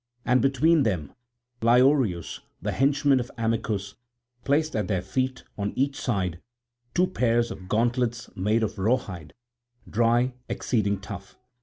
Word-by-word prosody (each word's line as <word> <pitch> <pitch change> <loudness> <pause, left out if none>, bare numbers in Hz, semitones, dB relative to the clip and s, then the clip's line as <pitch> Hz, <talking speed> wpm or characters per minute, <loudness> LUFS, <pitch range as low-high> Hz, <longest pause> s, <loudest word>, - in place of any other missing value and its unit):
And 125 0 +3
between 145 +4 +4
them 90 - -1 0.5
Lyeoreus, 120 - +3 0.2
the - - -2
henchman 140 0 +3
of 125 0 -4
Amycus, 110 -3 -1 0.5
placed 155 +3 +1
at 105 -4 0
their 95 -3 -1
feet 130 +6 -2 0.2
on 100 0 -2
each 140 +1 +1
side 90 -3 -2 0.5
two 180 - +4
pairs 120 -9 +1
of 90 0 -9
gauntlets 120 +1 0
made 105 +5 +1
of 110 -1 -3
raw 110 +7 +3
hide, 90 - -9 0.5
dry, 120 +3 +2 0.2
exceeding 100 -4 0
tough. 100 0 -9
115 Hz, 135 wpm, -26 LUFS, 100-130 Hz, 0.5 s, between